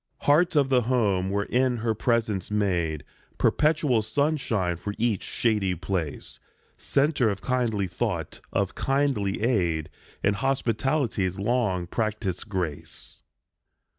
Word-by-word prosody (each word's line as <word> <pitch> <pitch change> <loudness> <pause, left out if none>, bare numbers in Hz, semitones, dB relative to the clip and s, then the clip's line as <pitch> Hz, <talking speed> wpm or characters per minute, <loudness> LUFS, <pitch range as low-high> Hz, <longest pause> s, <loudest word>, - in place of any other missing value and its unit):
Heart 165 +4 +3
of 140 -2 +3
the 130 -2 +4
home 105 -6 +1
wherein 120 +5 +1
her 115 0 0
presence 110 -4 0
made 90 -8 0 0.3
Perpetual 150 -6 +2
sunshine 110 - 0
for 100 +4 -5
each 115 -4 +1
shady 105 -6 0
place, 85 -4 -4 0.4
Centre 140 -4 +1
of 100 -1 -3
kindly 120 -6 0
thought, 90 - -3
of 100 -1 0
kindly 135 -8 0
aid, 85 -10 +1 0.3
And 100 0 +2
hospitality's 125 - 0
long 100 -4 0
practised 105 -1 -3
grace. 90 -7 -5
110 Hz, 110 wpm, -26 LUFS, 95-130 Hz, 0.4 s, the